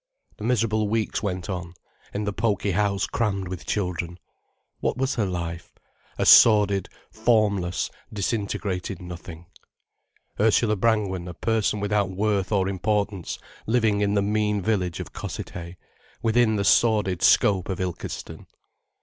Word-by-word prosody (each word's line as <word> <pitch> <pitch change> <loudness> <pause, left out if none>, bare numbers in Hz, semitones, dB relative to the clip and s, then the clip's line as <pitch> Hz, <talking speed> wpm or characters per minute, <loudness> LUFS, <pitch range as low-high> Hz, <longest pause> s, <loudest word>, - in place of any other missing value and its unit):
The - - -9
miserable 110 -2 +1
weeks 110 0 -1
went 95 -4 -3
on, 90 -3 -5 0.4
in 105 - -3
the 105 -1 -2
poky 105 -1 0
house 100 +1 +1
crammed 100 -5 -1
with 90 -1 -7
children. 90 -3 -2 0.6
What - - -1
was 135 +1 0
her 110 -4 0
life—a 85 -2 -6
sordid, 100 -4 +6 0.2
formless, 105 -5 +1 0.2
disintegrated 100 -2 -2
nothing; 90 -1 -9 0.9
Ursula 110 +1 +3
Brangwen 100 -4 0
a 90 - -7
person 110 0 0
without 100 -1 0
worth 100 +1 0
or 95 -3 +2
importance, 100 -1 -1 0.3
living 110 -3 +2
in 100 0 +1
the 100 - +2
mean 105 0 +1
village 90 -4 -1
of - - -7
Cossethay, 85 +1 -7 0.5
within 115 -1 +3
the 100 -1 0
sordid 105 -7 +3
scope 95 -3 +4
of 95 - -3
Ilkeston. 90 -2 -5
100 Hz, 130 wpm, -25 LUFS, 90-110 Hz, 0.9 s, sordid